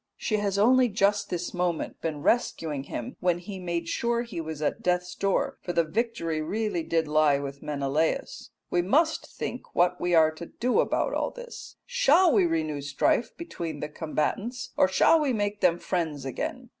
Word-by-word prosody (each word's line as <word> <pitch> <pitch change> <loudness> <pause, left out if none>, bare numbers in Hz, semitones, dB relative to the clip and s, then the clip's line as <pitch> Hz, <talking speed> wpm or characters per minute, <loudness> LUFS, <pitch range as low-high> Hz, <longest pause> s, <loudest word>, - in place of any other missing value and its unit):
She 215 - -1
has 200 -1 -1
only 250 +4 +5
just 205 0 +1
this 175 -1 -3
moment 175 -2 -2
been 150 -3 -3
rescuing 155 - 0
him 120 - -6
when 180 -1 +2
he 190 +2 -8
made 170 -2 -3
sure 235 +5 0
he 205 -8 -5
was 160 -2 -6
at 150 - -1
death's 180 0 0
door, 270 +8 0
for 175 - -4
the 170 - +3
victory 165 -4 -2
really 210 +2 -1
did 165 0 0
lie 150 -1 +4
with 140 0 -6
Menelaus. 150 - -1 0.2
We 175 - +3
must 310 - +2
think 250 - -7
what 180 +1 +2
we 175 -1 +2
are 160 -1 +6
to 165 +2 -9
do 250 +1 0
about - - +1
all - - 0
this. - - -10
Shall 475 - +4
we 195 -6 +4
renew 155 -3 -1
strife 145 - 0
between 170 - -5
the 150 - -4
combatants 185 +11 -3
or - - +4
shall 190 - +4
we 285 -4 +1
make 205 -1 -2
them 175 -2 +4
friends 160 -7 -2
again? 135 - -4
180 Hz, 180 wpm, -27 LUFS, 155-225 Hz, 0.2 s, are